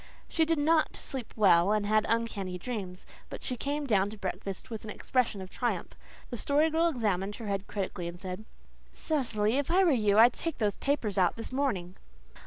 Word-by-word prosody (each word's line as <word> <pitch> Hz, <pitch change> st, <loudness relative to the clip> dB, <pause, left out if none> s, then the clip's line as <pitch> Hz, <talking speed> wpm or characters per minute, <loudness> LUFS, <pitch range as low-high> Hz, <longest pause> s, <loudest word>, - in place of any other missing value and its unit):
She 325 Hz, -, +2 dB
did 325 Hz, 0 st, +1 dB
not 310 Hz, +2 st, +2 dB
sleep 260 Hz, -4 st, -5 dB
well 185 Hz, -3 st, +5 dB
and 210 Hz, -1 st, +1 dB
had 215 Hz, +1 st, +2 dB
uncanny 220 Hz, -5 st, -1 dB
dreams, 185 Hz, -3 st, -5 dB, 0.2 s
but -, -, -8 dB
she 250 Hz, -, -2 dB
came 285 Hz, +4 st, -2 dB
down 200 Hz, -6 st, +2 dB
to 215 Hz, -, -9 dB
breakfast 195 Hz, +3 st, -5 dB
with 220 Hz, -, -5 dB
an 220 Hz, -, -8 dB
expression 225 Hz, -3 st, -1 dB
of 185 Hz, -, -11 dB
triumph. 245 Hz, -1 st, -2 dB, 0.4 s
The 240 Hz, -, -3 dB
Story 295 Hz, +7 st, +2 dB
Girl 325 Hz, +2 st, +3 dB
examined 205 Hz, -, -1 dB
her 230 Hz, -, -8 dB
head 200 Hz, -1 st, -2 dB
critically 185 Hz, -3 st, -3 dB
and 170 Hz, +1 st, -7 dB
said, 185 Hz, +2 st, -6 dB, 0.5 s
"Cecily, 240 Hz, -6 st, 0 dB
if 285 Hz, -, -2 dB
I 370 Hz, +3 st, +4 dB
were 350 Hz, -, +4 dB
you 210 Hz, -6 st, +3 dB
I'd 235 Hz, +3 st, +8 dB
take 330 Hz, -3 st, -3 dB
those 210 Hz, -3 st, 0 dB
papers 230 Hz, -9 st, 0 dB
out 180 Hz, -2 st, +3 dB
this 225 Hz, -, -5 dB
morning." 200 Hz, -10 st, -1 dB
220 Hz, 195 wpm, -30 LUFS, 195-275 Hz, 0.5 s, I'd